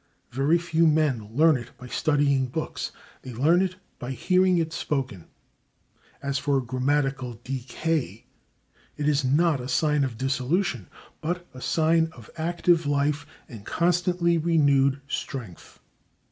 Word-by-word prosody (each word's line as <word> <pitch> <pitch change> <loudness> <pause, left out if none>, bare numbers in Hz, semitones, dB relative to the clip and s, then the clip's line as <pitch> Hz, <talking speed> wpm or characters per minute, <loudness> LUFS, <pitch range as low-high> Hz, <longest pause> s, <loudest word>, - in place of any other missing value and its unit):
Very 140 +7 +2
few 165 -1 +2
men 145 -9 +1
learn 160 +2 +5
it 120 -1 -11
by 125 - -11
studying 140 0 +1
books; 155 +6 -4 0.3
they 130 - -8
learn 160 +9 +4
it 185 -1 -1 0.2
by 125 +2 -4
hearing 185 +7 +3
it 165 -1 -1
spoken. 130 - -3 1.0
As 140 0 -1
for 140 0 +1
grammatical 130 -1 -1
decay, 130 - -3 0.7
it 150 -1 -1
is 145 -1 +2
not 145 +2 +2
a 125 - -6
sign 150 0 +2
of 125 -4 -3
dissolution, 135 - -1 0.3
but 175 +2 -3
a 130 - -10
sign 160 +2 +2
of 115 -4 -14
active 170 0 +1
life 145 0 0 0.2
and 110 -4 -10
constantly 175 - +1
renewed 140 -4 +3
strength. 120 - -6
145 Hz, 130 wpm, -26 LUFS, 130-165 Hz, 1.0 s, learn